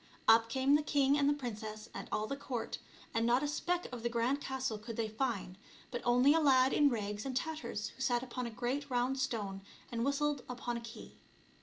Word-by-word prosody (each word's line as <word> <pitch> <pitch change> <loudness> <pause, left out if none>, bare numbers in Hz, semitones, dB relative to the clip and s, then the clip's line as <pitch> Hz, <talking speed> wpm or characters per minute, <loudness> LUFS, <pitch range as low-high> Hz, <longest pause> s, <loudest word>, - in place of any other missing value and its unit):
Up 225 0 +6
came 265 +3 +2
the 295 - +5
king 285 -2 +3
and 285 -1 +3
the - - +4
princess 215 -5 -6
and - - -7
all 215 - 0
the 275 - -3
court, 250 -4 -4 0.3
and 225 - +1
not 240 +4 +3
a - - +1
speck 350 +4 -1
of 245 -2 -6
the 235 - 0
grand 240 +4 0
castle 265 -5 -2
could 225 +1 -7
they 225 -1 0
find, 215 -5 -3 0.3
but 240 - -3
only 250 +4 +5
a 325 - +4
lad 265 -3 +5
in 290 -1 +5
rags 210 -3 -3
and 265 -2 -2
tatters 305 -8 -3
who - - -13
sat 245 -2 +1
upon 250 -1 -4
a - - -4
great 255 +5 -2
round 255 +2 +1
stone 210 -7 -2 0.3
and 230 -1 -1
whistled 280 0 0
upon 245 -1 -3
a 235 - -4
key. 230 0 -11
250 Hz, 215 wpm, -34 LUFS, 230-275 Hz, 0.3 s, Up